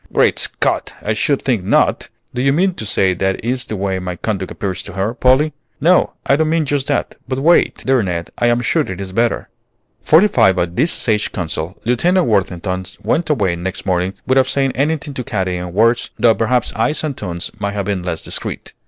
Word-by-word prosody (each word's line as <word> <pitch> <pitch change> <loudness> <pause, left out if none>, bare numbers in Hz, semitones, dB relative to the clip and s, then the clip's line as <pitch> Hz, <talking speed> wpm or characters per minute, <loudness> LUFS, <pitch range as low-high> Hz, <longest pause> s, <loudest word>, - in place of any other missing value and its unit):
"Great - - +3
Scott! - - -1
I 105 - 0
should 140 +6 0
think 120 -8 0
not! 95 - +2 0.2
Do 125 - -2
you 135 +1 +3
mean 180 +6 +2
to 110 - -6
say 95 -1 +3
that 95 +2 -1
is 125 +1 -1
the 110 - -4
way 95 -1 -1
my 90 -1 -4
conduct 95 -1 -3
appears 95 -2 -3
to 100 - -9
her, 100 +4 -1
Polly?" 130 +4 +3 0.3
"No, 175 +5 +3
I 140 - +4
don't 155 +1 +1
mean 160 -1 +1
just 140 -1 -1
that; 145 - -1
but 130 0 -2
wait, 165 +6 +3
dear 130 -2 +3
Ned, 85 -4 -3
I 120 - +1
am 120 0 +2
sure 120 - +1
it 95 -1 -5
is 95 -1 -5
better." 115 +4 0 0.5
Fortified 150 - +4
by 90 - +1
this 90 - 0
sage 110 -4 0
counsel, 85 0 -4
Lieutenant 170 +10 +2
Worthington 95 -3 0 0.2
went 170 - 0
away 100 - +1
next 90 +3 -4
morning, 90 0 0
without 130 0 +3
saying 135 0 +1
anything 145 +2 -1
to 125 - -4
Katy 95 -7 -2
in 90 0 -5
words, 115 +5 +2
though 115 -2 +5
perhaps 115 +3 0
eyes 130 +10 0
and 150 -3 -2
tones 85 -6 -5
may 100 -1 -1
have 100 -1 -3
been 100 -2 -1
less 90 -2 -4
discreet. - - -4
110 Hz, 205 wpm, -18 LUFS, 95-135 Hz, 0.5 s, though